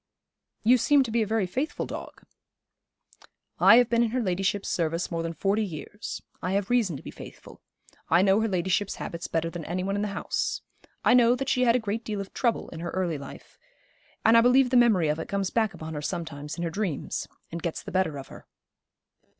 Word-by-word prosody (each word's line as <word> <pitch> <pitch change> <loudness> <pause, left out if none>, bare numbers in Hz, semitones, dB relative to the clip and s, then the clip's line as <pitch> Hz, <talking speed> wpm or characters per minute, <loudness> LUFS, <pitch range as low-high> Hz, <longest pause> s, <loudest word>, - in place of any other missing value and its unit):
'You 245 +3 +5
seem 280 +4 +4
to 235 - -5
be 230 +1 +2
a 215 - 0
very 220 -2 +1
faithful 260 - -3
dog.' - - -8 1.4
'I - - +8
have 245 0 +6
been 235 0 +2
in 235 - +2
her 255 +3 -1
ladyship's 195 -1 -1
service 165 +1 -1
more 165 -1 -1
than 165 0 -3
forty 200 +6 +1
years. 195 +3 -6 0.2
I 180 - -2
have 200 +2 -1
reason 220 - +2
to - - -13
be - - -8
faithful. - - -12 0.5
I 180 - +5
know 195 +2 +4
her 225 - +1
ladyship's 190 +1 0
habits 170 0 -5
better 165 0 -1
than 175 -1 -6
any 180 +2 -2
one 195 +1 -1
in 205 - -1
the 210 - 0
house. 200 0 -2 0.4
I - - +6
know 245 -1 +6
that 270 +1 -3
she 255 -1 +2
had 235 0 +4
a - - +3
great 220 +1 -3
deal 210 -2 -4
of 195 -1 -7
trouble 235 -3 0
in 165 - -8
her 170 +1 -4
early 175 -5 -1
life, 140 - -12 0.7
and 225 +1 +6
I 230 - +8
believe 250 +1 +4
the - - +2
memory 220 -9 +5
of 150 +1 0
it 165 - -6
comes 200 -1 -1
back 220 -3 +1
upon 160 0 -7
her 150 - -4
sometimes 150 -1 -5
in 170 - -3
her 165 - -2
dreams, 185 -6 -3 0.2
and 170 0 -5
gets 170 -1 -3
the - - -8
better 185 -5 0
of 135 - -9
her.' - - -13
195 Hz, 225 wpm, -27 LUFS, 170-230 Hz, 1.4 s, I